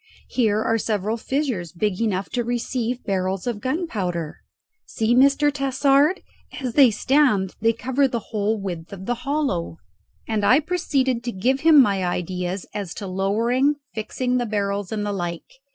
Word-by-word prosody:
Here 215 Hz, -4 st, +1 dB
are 225 Hz, 0 st, +1 dB
several 215 Hz, 0 st, -1 dB
fissures 235 Hz, -, -2 dB
big 195 Hz, +3 st, -2 dB
enough 200 Hz, -4 st, -1 dB
to 240 Hz, -1 st, -1 dB
receive 240 Hz, +1 st, -2 dB
barrels 190 Hz, -1 st, -1 dB
of 235 Hz, -4 st, -3 dB
gunpowder. 200 Hz, -, -2 dB, 0.5 s
See, 225 Hz, +1 st, 0 dB
Mr. 280 Hz, +3 st, +4 dB
Tassard, 275 Hz, +4 st, +2 dB, 0.4 s
as 255 Hz, -4 st, -3 dB
they 270 Hz, -2 st, +7 dB
stand 220 Hz, -4 st, +2 dB
they 225 Hz, +1 st, +4 dB
cover 260 Hz, +4 st, +1 dB
the 235 Hz, -4 st, -5 dB
whole 215 Hz, +1 st, 0 dB
width 175 Hz, -4 st, -6 dB
of 190 Hz, -1 st, -8 dB
the 245 Hz, -, 0 dB
hollow." 245 Hz, -, -2 dB, 0.5 s
And 220 Hz, -2 st, -1 dB
I 250 Hz, +7 st, +6 dB
proceeded 280 Hz, -7 st, 0 dB
to 240 Hz, -, -1 dB
give 250 Hz, +7 st, 0 dB
him 315 Hz, 0 st, +6 dB
my 200 Hz, -7 st, +3 dB
ideas 180 Hz, +1 st, -3 dB
as 200 Hz, -5 st, -5 dB
to 205 Hz, -, -6 dB
lowering, 225 Hz, +9 st, +1 dB, 0.2 s
fixing 250 Hz, +3 st, -2 dB
the 245 Hz, -1 st, -1 dB
barrels, 200 Hz, -2 st, -2 dB
and 210 Hz, -1 st, -2 dB
the 205 Hz, -, -2 dB
like. 175 Hz, +5 st, -5 dB
225 Hz, 160 wpm, -23 LUFS, 195-260 Hz, 0.5 s, they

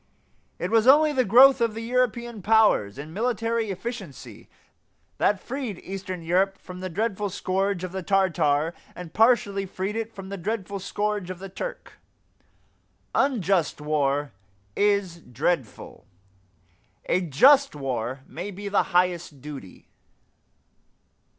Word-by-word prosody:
It -, -, -3 dB
was 225 Hz, +1 st, +3 dB
only 300 Hz, +3 st, +6 dB
the 260 Hz, -2 st, +2 dB
growth 255 Hz, +5 st, +7 dB
of 230 Hz, -2 st, +1 dB
the 225 Hz, -, -5 dB
European 240 Hz, -2 st, -1 dB
powers 210 Hz, -, +3 dB
in 150 Hz, +3 st, -8 dB
military 230 Hz, +1 st, -1 dB
efficiency 195 Hz, -, -7 dB, 0.7 s
that 205 Hz, -, +2 dB
freed 250 Hz, -5 st, -5 dB
eastern 185 Hz, -2 st, -6 dB
Europe 190 Hz, +4 st, +1 dB
from 180 Hz, -1 st, -10 dB
the 185 Hz, 0 st, -5 dB
dreadful 205 Hz, +2 st, -2 dB
scourge 195 Hz, 0 st, -1 dB
of 185 Hz, -, -4 dB
the 190 Hz, 0 st, -4 dB
Tartar 170 Hz, -5 st, +1 dB, 0.2 s
and 175 Hz, -3 st, -9 dB
partially 210 Hz, -4 st, +3 dB
freed 190 Hz, +3 st, -4 dB
it 225 Hz, 0 st, -3 dB
from 195 Hz, -3 st, -10 dB
the 200 Hz, -, -5 dB
dreadful 200 Hz, +1 st, -4 dB
scourge 205 Hz, 0 st, -2 dB
of 185 Hz, -, -5 dB
the 195 Hz, +2 st, -9 dB
Turk. -, -, -7 dB, 1.1 s
Unjust 195 Hz, -, +1 dB
war 145 Hz, -1 st, 0 dB, 0.4 s
is 200 Hz, -4 st, +1 dB
dreadful; 135 Hz, 0 st, -3 dB, 1.0 s
a 185 Hz, -, +1 dB
just 265 Hz, -, +5 dB
war 130 Hz, -2 st, -3 dB
may 180 Hz, +5 st, -7 dB
be 200 Hz, +1 st, -6 dB
the 200 Hz, -, +3 dB
highest 175 Hz, -5 st, 0 dB
duty. 135 Hz, -9 st, -10 dB
195 Hz, 130 wpm, -25 LUFS, 170-225 Hz, 1.1 s, growth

